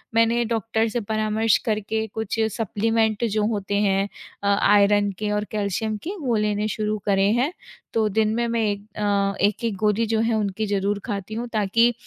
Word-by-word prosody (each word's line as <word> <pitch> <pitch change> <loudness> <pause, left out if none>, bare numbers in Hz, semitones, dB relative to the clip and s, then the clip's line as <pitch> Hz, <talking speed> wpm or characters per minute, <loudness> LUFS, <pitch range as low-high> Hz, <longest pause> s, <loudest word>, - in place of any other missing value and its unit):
मैंने 230 +1 +3
डॉक्टर 225 0 0
से 240 - -1
परामर्श 215 0 +2
करके 220 0 -1
कुछ 220 0 -3 0.2
सप्लीमेंट 220 +1 0
जो 215 -1 0
होते 205 -2 -2
हैं 195 -1 +2 0.4
अ, - - 0
आयरन 205 0 +4
के 210 -1 -1
और 210 0 0
कैल्शियम 215 +1 -1
के, 370 +5 -4
वो 250 -5 0
लेने 210 0 0
शुरू 215 0 -1
करे 195 -1 +3
हैं। 285 +6 +1 0.4
तो 220 -1 +2
दिन 215 +1 +1
में 235 0 0
मैं 230 0 0
एक 205 +1 -6
अ, 200 -1 +1
एक-एक 215 +1 -1
गोदी 210 +2 +2
जो - - +2
है, 225 +1 +1
उनकी 210 0 -1
ज़रूर 200 0 0
खाती 205 -3 -4
हूँ, 235 +2 -3
ताकि 230 +3 +3
215 Hz, 180 wpm, -23 LUFS, 205-225 Hz, 0.4 s, आयरन